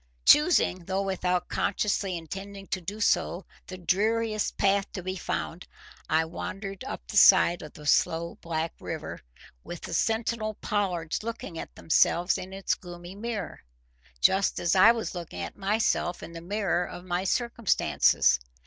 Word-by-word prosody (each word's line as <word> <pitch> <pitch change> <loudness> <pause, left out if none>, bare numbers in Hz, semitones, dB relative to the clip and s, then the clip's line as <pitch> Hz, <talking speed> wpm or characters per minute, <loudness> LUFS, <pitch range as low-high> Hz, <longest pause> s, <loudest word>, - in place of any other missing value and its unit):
Choosing, 295 - +5
though 195 +2 -1
without 180 -2 -1
consciously 200 -2 -1
intending 195 +4 -8
to 185 - -2
do 200 +5 -6
so, 190 -3 +1 0.2
the 185 - -7
dreariest 215 +4 0
path 200 0 +2
to 185 - -5
be 185 +1 -3
found, 175 -1 -4 0.4
I 160 +1 +3
wandered 195 +4 -6
up - - -6
the - - -4
side 175 +1 +7
of 150 - -10
the 150 - -12
slow 165 +3 +1
black 165 0 -2
river, - - -6 0.4
with - - -8
the - - -7
sentinel 220 -1 0
pollards 180 -7 -2
looking 215 -7 -6
at - - -8
themselves 175 +2 +2
in 185 - -8
its 195 0 -1
gloomy 175 0 -9
mirror, 210 -2 -5 0.6
just 190 - +3
as 170 - +1
I 200 +4 +8
was 230 -1 -3
looking 170 - -6
at 85 - -6
myself 200 -3 0
in 170 - -8
the 165 - -7
mirror 185 -1 0
of 175 0 -8
my 180 0 -1
circumstances. 230 - +2
190 Hz, 155 wpm, -27 LUFS, 175-205 Hz, 0.6 s, I